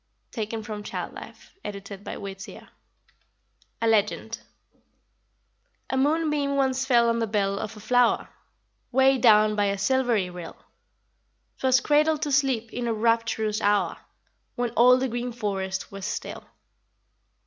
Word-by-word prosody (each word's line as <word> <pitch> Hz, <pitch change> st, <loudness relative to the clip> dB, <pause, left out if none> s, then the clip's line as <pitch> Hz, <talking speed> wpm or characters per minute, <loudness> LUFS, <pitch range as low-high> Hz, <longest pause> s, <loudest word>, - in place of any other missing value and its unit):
Taken 220 Hz, -1 st, -4 dB
from 210 Hz, -1 st, -6 dB
Child 205 Hz, -, -5 dB
Life, -, -, -12 dB
edited 200 Hz, -1 st, -8 dB
by -, -, -6 dB
Whittier. 195 Hz, 0 st, -9 dB, 1.1 s
A -, -, +3 dB
LEGEND. 220 Hz, +1 st, +1 dB, 1.5 s
A -, -, 0 dB
moonbeam 295 Hz, 0 st, +1 dB
once 265 Hz, -1 st, +1 dB
fell 240 Hz, -3 st, +4 dB
on 230 Hz, 0 st, +1 dB
the 225 Hz, -, 0 dB
bell 200 Hz, -2 st, 0 dB
of 215 Hz, 0 st, -6 dB
a -, -, -9 dB
flower, 245 Hz, +2 st, +2 dB, 0.6 s
Way 265 Hz, +1 st, +4 dB
down 215 Hz, -3 st, +5 dB
by 205 Hz, -1 st, +2 dB
a 200 Hz, 0 st, 0 dB
silvery 235 Hz, -2 st, +1 dB
rill; 175 Hz, -2 st, -9 dB, 1.0 s
'Twas 260 Hz, -1 st, +3 dB
cradled 305 Hz, +1 st, +2 dB
to 295 Hz, -, -2 dB
sleep 265 Hz, -5 st, +1 dB
in 245 Hz, -1 st, -3 dB
a 230 Hz, -, +1 dB
rapturous 225 Hz, -1 st, 0 dB
hour, 205 Hz, 0 st, +1 dB, 0.6 s
When 245 Hz, -1 st, -1 dB
all 250 Hz, +2 st, +6 dB
the 260 Hz, +1 st, 0 dB
green 245 Hz, +1 st, -3 dB
forest 195 Hz, -5 st, -3 dB
was 195 Hz, 0 st, -6 dB
still. 230 Hz, -, -5 dB
230 Hz, 135 wpm, -25 LUFS, 210-260 Hz, 1.5 s, all